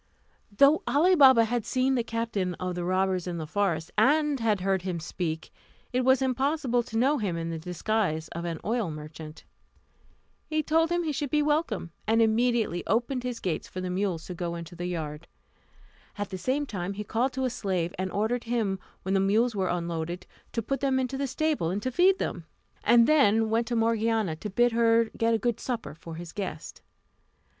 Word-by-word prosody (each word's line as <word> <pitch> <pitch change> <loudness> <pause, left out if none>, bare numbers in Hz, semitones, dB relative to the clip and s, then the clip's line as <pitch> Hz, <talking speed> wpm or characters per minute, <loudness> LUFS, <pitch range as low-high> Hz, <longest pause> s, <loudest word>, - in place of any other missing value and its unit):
Though 280 +9 +5
Ali 300 +9 +4
Baba 260 -8 +7
had 235 0 -1
seen 255 +3 +1
the 245 -3 +1
captain 225 -6 -2
of 185 +1 -3
the 175 0 -3
robbers 185 0 0
in 175 -1 -3
the 160 - -4
forest, 165 -2 -1
and 290 +3 +3
had 215 -4 +1
heard 190 0 +1
him 180 -2 -3
speak, 160 -1 -4 0.4
it 250 - +2
was 260 +1 +4
impossible 265 -1 +1
to 225 -1 -5
know 270 +5 +3
him 190 -6 -1
in 165 0 -3
the 165 - -4
disguise 180 -1 -1
of 170 - -6
an 165 -2 -3
oil 225 -4 0
merchant. 155 0 -9 1.0
He 310 -1 0
told 325 +2 +2
him 345 0 +1
he 315 - -1
should 285 0 -2
be 300 +1 +2
welcome, 295 - 0 0.2
and 225 +1 +3
immediately 225 -4 +2
opened 240 +4 0
his 245 -1 -4
gates 175 -4 -3
for 185 - -7
the 185 0 -3
mules 180 -3 -1
to 180 - -6
go 170 -1 -3
into 170 +1 -8
the 175 +1 -4
yard. 160 -2 -5 0.9
At 205 -1 -4
the 190 - -4
same 275 +8 0
time 195 -6 -4
he 210 +1 -5
called 240 +5 0
to 265 0 -1
a 255 - 0
slave, 185 -7 -2
and 185 0 -2
ordered 220 +5 -1
him, 220 -5 -1 0.2
when 190 - -1
the 195 - +3
mules 215 +5 +2
were 190 -2 0
unloaded, 170 0 -3 0.3
to 230 - -1
put 275 +5 -2
them 270 -1 +1
into 260 0 -1
the 275 +1 -1
stable, 290 - 0
and 190 +3 -1
to 255 - -1
feed 370 +7 +4
them; - - -4 0.4
and 235 -1 +6
then 225 -7 +4
went 230 +1 +1
to 240 - -1
Morgiana, 225 -5 +1
to 210 - -5
bid 240 +5 +3
her 230 0 +3
get 230 0 +2
a - - +2
good 235 +1 -1
supper 240 -9 -4
for 165 +1 -10
his 170 0 -8
guest. 200 -2 -6
220 Hz, 200 wpm, -27 LUFS, 180-255 Hz, 1.0 s, Baba